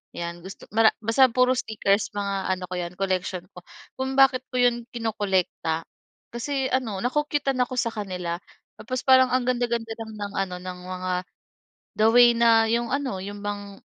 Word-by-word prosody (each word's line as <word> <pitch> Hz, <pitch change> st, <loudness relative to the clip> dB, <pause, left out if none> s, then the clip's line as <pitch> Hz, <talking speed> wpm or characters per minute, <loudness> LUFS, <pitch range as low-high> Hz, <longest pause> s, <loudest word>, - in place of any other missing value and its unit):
'yan. 170 Hz, 0 st, -5 dB
Gusto 190 Hz, -, -10 dB
mara 220 Hz, 0 st, +6 dB
basta 245 Hz, +4 st, +5 dB
puro 255 Hz, +2 st, +3 dB
stickers 210 Hz, -3 st, 0 dB
mga 195 Hz, -1 st, -1 dB
ano 185 Hz, -, -8 dB
ko 185 Hz, -, -5 dB
'yan 175 Hz, 0 st, -4 dB
collection 185 Hz, -2 st, -2 dB
ko. 180 Hz, -, -11 dB, 0.4 s
Kung 265 Hz, 0 st, -2 dB
bakit 270 Hz, -1 st, +5 dB
ko 255 Hz, -, -4 dB
'yon 240 Hz, -1 st, +2 dB
kinokolekta, 190 Hz, -7 st, -1 dB, 0.5 s
kasi 265 Hz, +3 st, -2 dB
ano 235 Hz, -6 st, 0 dB
na-cu-cute-tan 285 Hz, 0 st, 0 dB
ako 250 Hz, +1 st, -6 dB
sa 230 Hz, -, 0 dB
kanila. 180 Hz, -5 st, -4 dB, 0.4 s
Tapos 255 Hz, +2 st, -4 dB
parang 260 Hz, -1 st, +6 dB
ang 255 Hz, -1 st, +2 dB
ganda-ganda 235 Hz, -2 st, -1 dB
lang 225 Hz, -1 st, -6 dB
ng 205 Hz, -1 st, -5 dB
ano 185 Hz, -2 st, -3 dB
ng 180 Hz, 0 st, -7 dB
mga, 185 Hz, 0 st, -4 dB, 0.9 s
the 215 Hz, -, +5 dB
way 240 Hz, 0 st, +7 dB
na 230 Hz, -1 st, +5 dB
'yong 235 Hz, +1 st, 0 dB
ano 275 Hz, -8 st, -2 dB
'yong 205 Hz, +1 st, -7 dB
bang 205 Hz, -1 st, -5 dB
225 Hz, 170 wpm, -25 LUFS, 190-250 Hz, 0.9 s, way